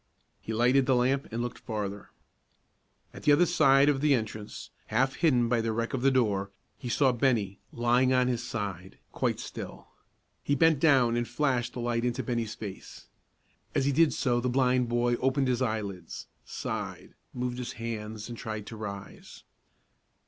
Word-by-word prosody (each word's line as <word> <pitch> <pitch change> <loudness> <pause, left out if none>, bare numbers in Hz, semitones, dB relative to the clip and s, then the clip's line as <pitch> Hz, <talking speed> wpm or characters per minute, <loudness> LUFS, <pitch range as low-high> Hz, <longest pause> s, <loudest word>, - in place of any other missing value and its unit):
He - - -7
lighted 125 +4 +3
the 130 - +4
lamp 130 +3 +1
and 115 +2 -2
looked 120 - -5
farther. 100 -2 -5 1.0
At - - -10
the 150 - +4
other 145 +5 +6
side 140 -5 +5
of 140 -2 +2
the 145 -2 +4
entrance, 110 -2 -6 0.2
half 130 +4 +1
hidden 130 -8 +3
by 115 -1 +2
the 115 0 -1
wreck 115 +1 -2
of 130 - -1
the 135 - +4
door, 105 -7 +1 0.3
he 125 - -5
saw 135 +2 +3
Bennie, 115 -6 0
lying 120 +2 +2
on 125 -1 +3
his 120 -2 0
side, 100 -6 -5
quite - - -1
still. - - -8 0.5
He 145 - 0
bent 160 0 +4
down 130 -7 +4
and 120 0 -1
flashed 130 -5 0
the 125 - -5
light 120 0 -1
into 125 +1 -1
Bennie's 115 -2 -2
face. 100 -3 -9 0.7
As 135 - +2
he 140 - +3
did 160 +2 +4
so 120 -2 +1
the 125 - 0
blind 125 -1 +2
boy 120 0 +1
opened 135 +1 +1
his 125 0 0
eyelids, 105 -7 -3 0.2
sighed, - - -5 0.2
moved 125 0 -3
his 125 - -5
hands, 110 -2 -5
and 120 - -6
tried 110 -2 -5
to 115 - -8
rise. 100 -2 -8
120 Hz, 175 wpm, -29 LUFS, 110-130 Hz, 1.0 s, other